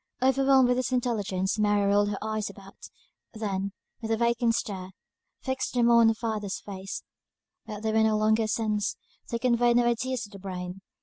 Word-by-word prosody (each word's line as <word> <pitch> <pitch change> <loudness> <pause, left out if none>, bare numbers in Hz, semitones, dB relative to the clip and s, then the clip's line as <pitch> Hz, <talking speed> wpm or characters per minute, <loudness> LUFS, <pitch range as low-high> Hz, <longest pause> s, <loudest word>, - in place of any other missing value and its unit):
Overwhelmed 265 0 +4
by 250 - +3
this 255 0 -1
intelligence, 210 -6 -1
Mary 205 -1 +3
rolled 205 +1 +3
her 205 - -3
eyes 215 -1 -2
about, 195 -1 -13 0.5
then, 200 -2 -2 0.3
with 225 - -4
a 225 - +1
vacant 235 0 +2
stare, 190 -5 -4 0.5
fixed 260 -1 -3
them 240 -1 +4
on 235 -1 +6
her 225 - +3
father's 215 -3 -3
face; 195 -1 -7 0.6
but 210 -1 -7
they 220 - 0
were 220 - +4
no 220 -1 +3
longer 220 +1 +3
a - - -3
sense; 215 -1 -1 0.3
they 235 - -1
conveyed 240 0 +3
no 240 - +4
ideas 250 +1 0
to 205 - -9
the 200 - -10
brain. 185 0 -6
220 Hz, 185 wpm, -27 LUFS, 200-240 Hz, 0.6 s, on